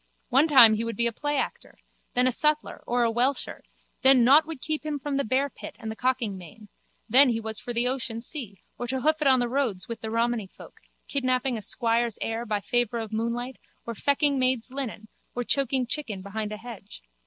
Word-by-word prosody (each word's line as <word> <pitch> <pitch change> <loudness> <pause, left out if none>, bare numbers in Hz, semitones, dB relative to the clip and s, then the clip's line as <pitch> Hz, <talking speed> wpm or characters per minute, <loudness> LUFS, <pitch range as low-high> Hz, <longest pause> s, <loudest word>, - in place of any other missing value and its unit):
One 275 +5 +4
time 250 -7 +8
he 215 +1 -1
would 230 0 -4
be 235 - 0
a 235 - +1
playactor, 290 +5 -3 0.4
then 250 +1 +4
a 255 - +3
sutler 300 +4 -1
or 245 0 +1
a 230 - +2
welsher, 250 +4 0 0.4
then 265 -2 +7
nought 290 +6 +6
would 325 -4 -6
keep 310 +3 -3
him 305 -1 -3
from 280 0 -3
the 280 - +1
bearpit 265 +3 -2
and 220 0 -6
the - - -7
cocking 240 -6 -1
main, 200 +5 -14 0.4
then 260 +4 +7
he 230 -2 0
was 220 -1 -3
for 245 - -6
the 240 +1 +1
ocean 250 -3 -2
sea 230 - -8 0.2
or 245 - -3
to 260 +1 -2
hoof 310 +3 +2
it 295 - +2
on 260 -1 +6
the 245 -1 0
roads 240 -7 -1
with 230 - -6
the 220 - -4
romany 230 -2 0
folk, - - -15 0.3
kidnapping 255 -2 0
a 220 - -5
squire's 230 0 0
heir 225 +1 -3
by 210 -1 -1
favour 240 +1 0
of 225 -1 -5
moonlight 235 +3 -3 0.3
or 235 - -4
fecking 280 +3 +1
maids' 255 -1 0
linen 250 -5 -5 0.3
or 245 - -1
choking 265 0 +1
chicken 235 -7 -3
behind 210 +1 -4
a 215 - -5
hedge. 215 - -11
245 Hz, 210 wpm, -26 LUFS, 225-270 Hz, 0.4 s, time